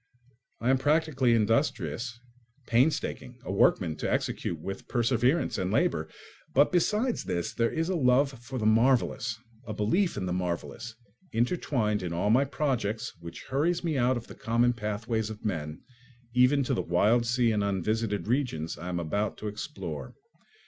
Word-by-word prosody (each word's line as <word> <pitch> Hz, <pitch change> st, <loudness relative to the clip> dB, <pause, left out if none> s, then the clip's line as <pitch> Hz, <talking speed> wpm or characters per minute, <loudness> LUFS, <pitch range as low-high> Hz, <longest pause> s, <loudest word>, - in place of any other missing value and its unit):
I 120 Hz, +3 st, +2 dB
am 130 Hz, -, +3 dB
practically 145 Hz, -5 st, +2 dB
industrious—painstaking, 120 Hz, -, -1 dB
a -, -, -3 dB
workman 90 Hz, -4 st, +3 dB
to -, -, -2 dB
execute 85 Hz, -, -1 dB
with 95 Hz, +4 st, -6 dB
perseverance 125 Hz, +5 st, +1 dB
and 90 Hz, -, -1 dB
labour—but 130 Hz, -, 0 dB
besides 210 Hz, +7 st, +1 dB
this 85 Hz, -2 st, -2 dB
there 115 Hz, 0 st, +1 dB
is 165 Hz, 0 st, -1 dB
a 185 Hz, -, 0 dB
love 135 Hz, -1 st, +3 dB
for 130 Hz, +2 st, -6 dB
the 110 Hz, -, -2 dB
marvellous, 115 Hz, -1 st, +2 dB, 0.3 s
a 110 Hz, -, -4 dB
belief 170 Hz, -, +1 dB
in -, -, -2 dB
the 90 Hz, -, -2 dB
marvellous, 90 Hz, +6 st, -4 dB, 0.4 s
intertwined 115 Hz, -, 0 dB
in 90 Hz, -2 st, -3 dB
all 95 Hz, +5 st, +1 dB
my 130 Hz, +5 st, +4 dB
projects, 125 Hz, -7 st, -2 dB
which 85 Hz, 0 st, -9 dB
hurries 155 Hz, +7 st, 0 dB
me 165 Hz, -3 st, 0 dB
out 130 Hz, -1 st, +2 dB
of 115 Hz, -, -7 dB
the -, -, -11 dB
common 120 Hz, +2 st, +1 dB
pathways 110 Hz, 0 st, -2 dB
of 110 Hz, 0 st, -9 dB
men, 80 Hz, -6 st, -3 dB, 0.5 s
even 125 Hz, +3 st, +4 dB
to -, -, -1 dB
the -, -, 0 dB
wild 105 Hz, +8 st, +2 dB
sea 120 Hz, -1 st, +2 dB
and 105 Hz, -2 st, +1 dB
unvisited 105 Hz, +2 st, -1 dB
regions 115 Hz, -, -1 dB
I 90 Hz, -, -5 dB
am 90 Hz, -1 st, -2 dB
about 100 Hz, +6 st, -2 dB
to 105 Hz, -, -5 dB
explore. 95 Hz, -, -6 dB
115 Hz, 155 wpm, -28 LUFS, 100-130 Hz, 0.5 s, my